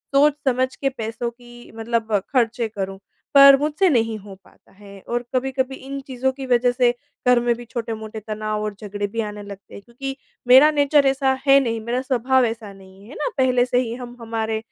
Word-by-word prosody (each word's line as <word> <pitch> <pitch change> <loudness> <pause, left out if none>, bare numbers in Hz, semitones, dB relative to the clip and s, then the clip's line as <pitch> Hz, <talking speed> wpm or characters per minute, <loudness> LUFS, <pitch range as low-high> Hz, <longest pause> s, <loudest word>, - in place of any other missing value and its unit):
सोच 290 +2 +5
समझ 260 0 +1
के 275 - -1
पैसों 230 -1 -4
की 240 0 -15
मतलब 225 -1 -2 0.2
खर्चे 235 -2 +1
करूँ, 195 -2 -5 0.4
पर 275 -1 +9
मुझसे 300 +6 +1
नहीं 225 -5 +1
हो 200 -1 -12
पाता - - -25
है। 200 0 -14
और 240 0 -1
कभी-कभी 265 +1 -1
इन 275 +1 -7
चीज़ों 265 0 -1
की 270 0 -8
वजह 245 0 +3
से 245 -1 +2 0.3
घर 250 -1 +6
में 240 0 +1
भी 240 +1 -10
छोटे-मोटे 225 -2 -6
तनाव 215 0 -3
और 210 -1 -4
झगड़े 205 0 -4
भी 225 +3 -3
आने 210 -1 -6
लगते 200 -1 -12
हैं। - - -9
क्योंकि 270 +4 -7 0.3
मेरा 260 +5 +8
नेचर 290 -1 +3
ऐसा 270 -1 +1
है 275 0 +7
नहीं। 230 -2 -2
मेरा 245 +2 -1
स्वभाव 260 0 +2
ऐसा 225 -2 -5
नहीं 195 +1 -17
है 265 - -11
ना। - - -1
पहले 255 -2 +3
से 250 0 +1
ही 235 -2 -2
हम 245 -1 -9
हमारे 225 -1 -2
240 Hz, 200 wpm, -22 LUFS, 220-265 Hz, 0.4 s, पर